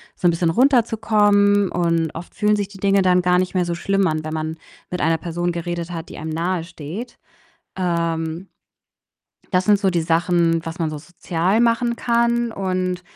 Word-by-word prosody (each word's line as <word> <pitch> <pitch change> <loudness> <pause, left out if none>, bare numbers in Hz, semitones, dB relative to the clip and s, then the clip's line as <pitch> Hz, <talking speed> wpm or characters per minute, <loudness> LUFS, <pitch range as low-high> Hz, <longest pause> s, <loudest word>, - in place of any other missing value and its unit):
so 180 - +1
'n - - +5
bisschen 170 0 0
runterzukommen, 210 -4 +3
und 165 -2 +1
oft 170 +1 -8
fühlen 210 0 +2
sich 205 -1 -2
die 195 -1 -14
Dinge 195 0 +3
dann 180 -1 +4
gar 180 0 +3
nicht 185 0 0
mehr 180 -2 +1
so 170 0 -2
schlimm 195 +2 +1
an, 155 -1 -1
wenn 155 - -4
man 160 0 -3 0.3
mit 180 - -3
einer 165 0 +2
Person 175 +1 -2
geredet 170 0 -4
hat, 165 -1 -6
die - - -10
einem 160 0 -5
nahe 170 +2 -1
steht. 170 - -8 0.6
Ähm 170 -1 -2 1.1
das 180 0 +2
sind 205 0 +4
so 195 -1 +1
die 170 -2 0
Sachen, 165 0 +1
was 165 +1 -6
man 165 -2 -1
so 155 - -5
sozial 175 +5 -1
machen 235 0 +2
kann. 235 0 +1
Und 185 -2 -2
180 Hz, 185 wpm, -21 LUFS, 165-200 Hz, 1.1 s, n